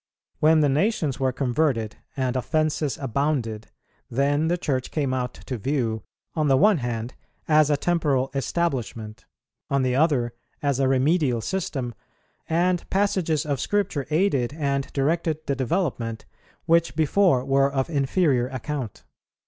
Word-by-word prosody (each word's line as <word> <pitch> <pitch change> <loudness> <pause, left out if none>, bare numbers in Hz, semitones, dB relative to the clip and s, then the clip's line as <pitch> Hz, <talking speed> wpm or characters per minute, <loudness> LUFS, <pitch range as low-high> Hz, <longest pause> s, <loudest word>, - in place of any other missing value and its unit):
When 155 +1 +5
the 150 - +4
nations 155 - +1
were 130 -1 +1
converted 125 -3 0 0.2
and 130 -1 0
offences 155 +1 0
abounded, 130 -4 -1 0.4
then 145 +5 +1
the 175 +2 +1
Church 130 -6 -2
came 140 -4 -1
out 125 -1 -2
to 125 -3 -6
view, 115 -3 -1 0.3
on 155 -2 0
the 135 -1 +4
one 205 +1 +5
hand 120 -1 -3 0.3
as 155 -1 +4
a 145 - +3
temporal 145 -6 +1
establishment, 130 - -2 0.4
on 140 -1 +1
the 125 -1 +1
other 135 -6 +2 0.3
as 140 -2 0
a 135 - +3
remedial 135 -1 +2
system, 130 - -3 0.6
and 175 +2 +1
passages 185 -6 +1
of 140 -3 -1
Scripture 195 -8 -1
aided 150 -7 +1
and 140 -3 -1
directed 155 +2 0
the 140 - 0
development 130 - -2 0.4
which 170 0 +3
before 160 -3 +3
were 135 0 +3
of 135 -1 0
inferior 140 -3 +1
account. 130 -2 -5
140 Hz, 140 wpm, -24 LUFS, 130-160 Hz, 0.6 s, When